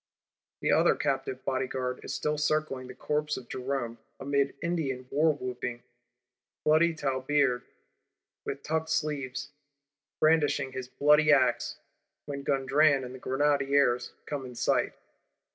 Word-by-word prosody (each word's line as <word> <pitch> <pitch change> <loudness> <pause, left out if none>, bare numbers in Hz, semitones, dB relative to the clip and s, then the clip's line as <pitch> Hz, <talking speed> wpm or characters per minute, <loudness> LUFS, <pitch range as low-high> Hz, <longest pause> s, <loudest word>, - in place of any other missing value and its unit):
The - - +2
other - - +4
captive 400 -2 -2
Bodyguard 130 -1 -2
is - - -6
still 150 0 -1
circling 150 -4 0
the 125 - -10
corpse 150 +3 -1
of 125 - -9
Jerome, 125 -3 -3 0.2
amid 140 0 0
Indian 140 -7 -2
war 155 +3 +4
whooping; 125 -3 -5 0.8
bloody 155 +2 +4
Tilebeard, 135 -2 +1 0.8
with 140 0 -5
tucked 160 +1 -1
sleeves, 145 -3 -2 0.7
brandishing 150 -4 +3
his 130 -1 -5
bloody 150 +3 +4
axe; 130 -4 +3 0.5
when 140 -1 -5
Gondran 140 +1 +3
and 125 0 -7
the 130 - -9
Grenadiers 140 -2 +2
come 145 -2 -4
in 125 -1 -9
sight. - - +1
140 Hz, 125 wpm, -29 LUFS, 130-150 Hz, 0.8 s, other